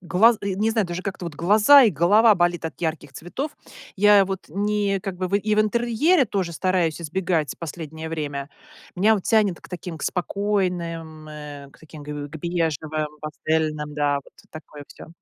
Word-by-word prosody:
глаз 195 +6 +4
э, 200 - -2
не 215 +4 +1
знаю, 220 -4 0
даже 175 +1 -5
как-то 195 -2 -5
вот 170 - -6
глаза 210 - +6
и 230 - +5
голова 205 +7 +5
болит 175 -2 0
от 160 - -6
ярких 155 -4 -3
цветов. 260 - -6 0.4
Я 205 0 +6
вот 190 0 -5
ни 205 +2 0
как 195 -2 -5
бы 185 0 -3
в 195 - -2
и 210 +1 0
в 215 - +3
интерьере 240 - +2
тоже 190 -5 -2
стараюсь 175 -2 0
избегать 165 -2 -1
в - - -38
последнее 160 -1 -7
время. 145 -3 -4 0.5
Меня 210 +5 +4
вот 200 - -3
тянет 210 -6 +2
к - - -15
таким, 180 -2 -7
к - - -10
спокойным, 175 -5 -2
э, 145 -2 -9
к - - -21
таким 155 -1 -12
к - - -13
к 145 -1 -5
к 160 - -6
бежевым, 155 -2 -2
пастельным 155 -1 -2
да. 145 -1 +1
Вот - - -20 0.2
такое 150 -2 -11
всё. - - -12
175 Hz, 190 wpm, -23 LUFS, 155-205 Hz, 0.5 s, глаза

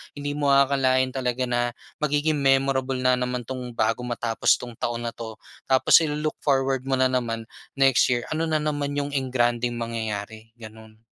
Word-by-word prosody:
hindi 145 0 -4
mo 145 -1 0
aakalain 130 -2 +3
talaga 130 -1 -1
na 120 0 -1 0.2
magiging 150 +1 +1
memorable 135 -1 +2
na 125 0 +2
naman 125 -1 -2
'tong 125 -1 -6
bago 115 +1 0
matapos 120 -1 +1
'tong 125 - -8
taon 120 0 -2
na 115 - -2
'to. 110 -1 -8 0.3
Tapos 130 +4 +6
i-lo-look 150 -1 -2
forward 135 -2 0
mo 135 - +2
na 130 0 +2
naman 115 -3 -1 0.3
next 135 -2 +4
year 120 -1 0
ano 160 +1 -1
na 155 - 0
naman 145 -2 -2
'yong 145 0 -2
engrandeng 120 -3 0
mangyayari, 110 -2 -5
gano'n. 110 -1 -14
130 Hz, 165 wpm, -24 LUFS, 120-140 Hz, 0.3 s, Tapos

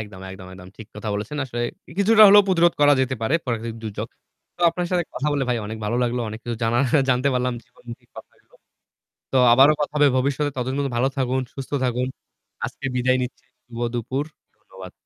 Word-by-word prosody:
একদম, 105 -3 -9
একদম, 95 -1 -10
একদম 90 0 -12
ঠিক 110 - -10
কথা 105 +1 -6
বলেছেন। 105 +8 -5
আসলে 120 -2 -4 0.3
ই - - -10
কিছুটা 215 +2 +6
হলেও 205 +1 +8
প্রতিরোধ 175 -2 +3
করা 145 0 +6
যেতে 130 0 0
পারে 115 +7 0
প্রাকৃতিক 115 -2 -3
দুর্যোগ। 110 -2 -5 0.5
তো - - -18
আপনার 175 +1 -3
সাথে 180 -2 +1
কথা 140 - -3
বলে 140 -2 0
ভাই 120 -1 +1
অনেক 110 +1 -6
ভালো 110 +3 -1
লাগলো। 120 0 -1
অনেক 110 - -7
কিছু 120 -1 -4
জানার 120 +3 +2 0.3
জানতে 125 +2 +2
পারলাম। 125 0 0
জীবনমূখী 120 -1 -13
কথা - - -11
হইলো। - - -30 0.8
তো 135 - +2 0.2
আবারো 135 +4 +7
কথা 145 - -2
হবে 145 -1 +5
ভবিষ্যতে 140 +2 0
ততদিন 130 +1 -3
পর্যন্ত 140 -2 -1
ভালো 130 +3 +2
থাকুন, 130 0 0
সুস্থ 135 -1 -8
থাকুন। 125 +1 -1 0.6
আজকে - - -5
বিদায় 130 +1 +2
নিচ্ছি 125 - -7 0.2
শুভ 120 -1 -11 0.2
দুপুর। 130 +4 -2 0.3
ধন্যবাদ। 95 -1 -12
125 Hz, 200 wpm, -22 LUFS, 115-140 Hz, 0.8 s, হলেও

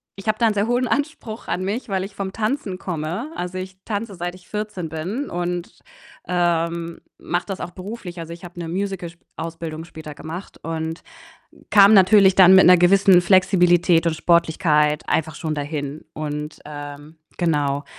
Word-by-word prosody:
ich 195 +2 -11
habe 215 0 +1
da 235 - +2
einen 220 - +3
sehr 205 +2 0
hohen 245 +1 +1
Anspruch 285 -6 -3
an 185 - -2
mich, 215 +7 -3
weil 190 -1 -1
ich 195 +1 -8
vom 195 -1 -4
Tanzen 215 -4 -2
komme. 180 - -4
Also, 180 +1 -4
ich 185 0 -7
tanze 210 -1 -3
seit 175 +1 -4
ich 180 - -18
14 210 -6 -4
bin 185 - -4
und, 175 0 -4 0.5
ähm, 170 -1 -1 0.2
mache 175 0 -2
das 195 -2 -5
auch 175 - -5
beruflich. 185 -2 -8
Also, 165 0 -7
ich 170 - -13
habe 175 0 -10
'ne 165 - -4
Musicalausbildung 170 -3 -5
später 155 -2 -10
gemacht 165 +6 -8
und 160 0 -4 0.7
kam 200 0 +7
natürlich 190 0 +6
dann 190 0 +8
mit 190 - +8
'ner 180 0 +8
gewissen 185 +1 +6
Flexibilität 175 -2 +4
und 165 - +1
Sportlichkeit 155 -3 +2
einfach 160 -1 0
schon 155 -1 -3
dahin. 145 0 -5
Und, 150 0 -5
ähm, 145 +1 -9 0.2
genau, 145 -4 0
175 Hz, 165 wpm, -22 LUFS, 160-195 Hz, 0.7 s, dann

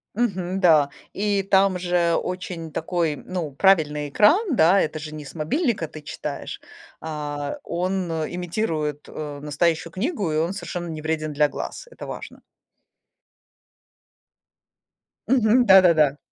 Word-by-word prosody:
Мгм. 190 -5 -1
Да, 155 -6 +5 0.2
и 200 -1 0
там 195 -1 +3
же 175 -2 +1
очень 180 -3 -4
такой, 165 -2 -1
ну, 175 -5 -5
правильный 150 -3 +3
экран, 310 - +4
да. 180 +3 +5
Это 155 -2 -1
же 155 0 -7
не 150 -1 -8
с 140 - -11
мобильника 200 - 0
ты 155 - -10
читаешь. - - -6 0.4
А 145 -2 -4
он, 180 +1 -2
э, 160 -1 -2
имитирует, 165 -5 -2
э, 150 -2 -6
настоящую 160 +3 0
книгу, 205 - -1
и 155 - 0
он 170 +4 0
совершенно 175 -2 -5
не 155 -1 -5
вреден 155 -1 -2
для 150 +1 +3
глаз. - - -6
Это - - -7
важно. - - -8 2.9
Мгм, 245 -1 +4
да-да-да. 170 -7 +6
170 Hz, 130 wpm, -23 LUFS, 155-190 Hz, 2.9 s, да-да-да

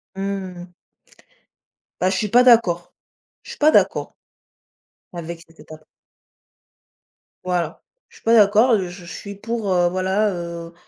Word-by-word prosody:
Mmh. 190 -2 -5 1.3
Bah 185 - +3
je 190 - -1
suis 210 +3 -2
pas 245 +5 +5
d'accord. 205 -9 +3 0.5
Je - - -14
suis - - -10
pas 305 +1 +4
d'accord. - - +1 1.0
Avec 170 -1 -7
cette 165 0 -21
étape 155 0 -14 1.6
Voilà. 175 -3 -2 0.3
Je - - -19
suis - - -22
pas 225 - +3
d'accord 220 +3 +5
et - - +1
je 180 - -6
je 175 0 -11
suis 200 +4 -8
pour, 220 0 -4
heu, 175 -1 +3
voilà, 190 +4 0
heu, 170 -1 -7
185 Hz, 145 wpm, -21 LUFS, 175-210 Hz, 1.6 s, pas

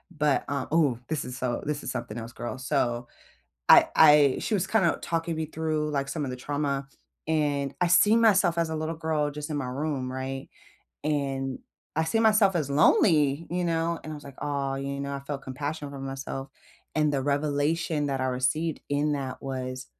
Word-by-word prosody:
But, 150 -2 +2
uh 140 -2 -2
ooh, 145 -8 +3
this 155 -2 -2
is 125 - -6
so 125 -2 -2
this 150 0 -2
is - - -3
something 105 - -5
else, 115 0 -6
girl. 120 +2 -5
So, 120 -3 -1 0.6
I - - +8
I 150 -3 +7
she 220 - -1
was 190 -2 +1
kinda 195 -5 +2
talking 165 -1 -2
me 160 -1 -2
through, 155 -1 -2
like, 140 -2 -1
some 150 +1 -2
of 130 - -3
the - - -5
trauma, 140 0 -2 0.4
and 145 -3 0
I 180 - +4
see 205 +5 +6
myself 195 -7 +4
as 165 -1 +1
a - - -2
little 155 +1 -3
girl 155 -2 0
just 150 +1 -6
in 150 - -2
my 135 - -2
room, 135 -1 -3
right? 135 0 -5 0.6
And 135 -3 -1 0.4
I 160 - +3
see 195 +8 0
myself 215 -3 +4
as 150 -4 -1
lonely, 150 0 +4
you 180 +1 -1
know? 165 0 0
And 155 - -6
I - - -5
was 145 - -12
like, 140 -1 -11
"Aw," 140 -2 -1
you 140 0 -4
know, 140 0 -3
I 140 - -4
felt 140 0 -5
compassion 145 +3 -4
for 140 - -8
myself. 135 0 -5 0.5
And 150 -1 +2
the 135 -2 0
revelation 145 +2 0
that 135 -1 -1
I 130 - 0
received 130 +6 0
in 145 +1 +1
that 135 -3 -4
was, 130 -1 -4
145 Hz, 200 wpm, -27 LUFS, 135-160 Hz, 0.6 s, I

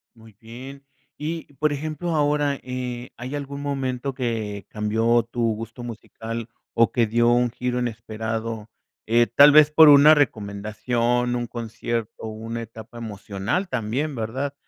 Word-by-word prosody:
Muy 110 -1 -17
bien. 130 +4 -10 0.3
Y, 160 +1 -5
por 150 +2 +1
ejemplo, 155 +3 -3
ahora, 145 -1 +1
eh, 125 -1 -5
¿hay 125 +4 -5
algún 140 0 -5
momento 135 -2 -2
que 110 -6 -3
cambió 115 +2 +1
tu 120 +1 -5
gusto 115 +2 -8
musical 115 0 -7 0.2
o 115 0 +3
que 115 -2 +2
dio 120 +2 +3
un 120 0 +3
giro 125 +1 -2
inesperado?, 110 -1 -4 0.4
eh, 120 +1 +5
tal 140 +5 +7
vez 150 0 +7
por 155 0 +8
una 145 +2 +9
recomendación, 115 0 0
un 120 - -3
concierto, 115 -1 -4
una 115 +2 -5
etapa 115 +1 -11
emocional 105 - -3
también, 130 +5 -2
¿verdad? 130 +5 -3
120 Hz, 140 wpm, -23 LUFS, 115-140 Hz, 0.4 s, una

